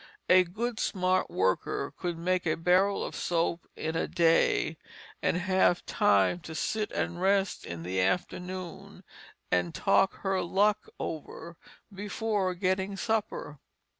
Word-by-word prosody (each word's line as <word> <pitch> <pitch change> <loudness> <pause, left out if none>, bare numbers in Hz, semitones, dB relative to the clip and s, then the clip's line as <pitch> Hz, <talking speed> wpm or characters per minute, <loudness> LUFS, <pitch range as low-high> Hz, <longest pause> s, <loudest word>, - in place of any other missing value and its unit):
A 185 0 +7
good 220 +6 -4
smart 185 -1 +1
worker 95 0 0
could 175 -2 -3
make 180 +1 0
a 155 - +2
barrel 185 +4 +3
of - - -6
soap 170 0 -1
in 160 +1 -3
a - - 0
day, 165 -1 +2 0.4
and - - +1
have 185 -1 +2
time 100 - +3
to 160 -1 -9
sit 215 +6 -1
and 175 0 -2
rest 195 0 +1
in 85 -1 -6
the 95 +1 -1
afternoon 180 - -3 0.5
and 90 -2 +1
talk 195 - +3
her 190 -1 0
luck 205 +4 +1
over, 165 +1 -6 0.4
before 205 -1 -1
getting 190 +2 -1
supper. 215 -9 -2
180 Hz, 135 wpm, -29 LUFS, 165-195 Hz, 0.5 s, A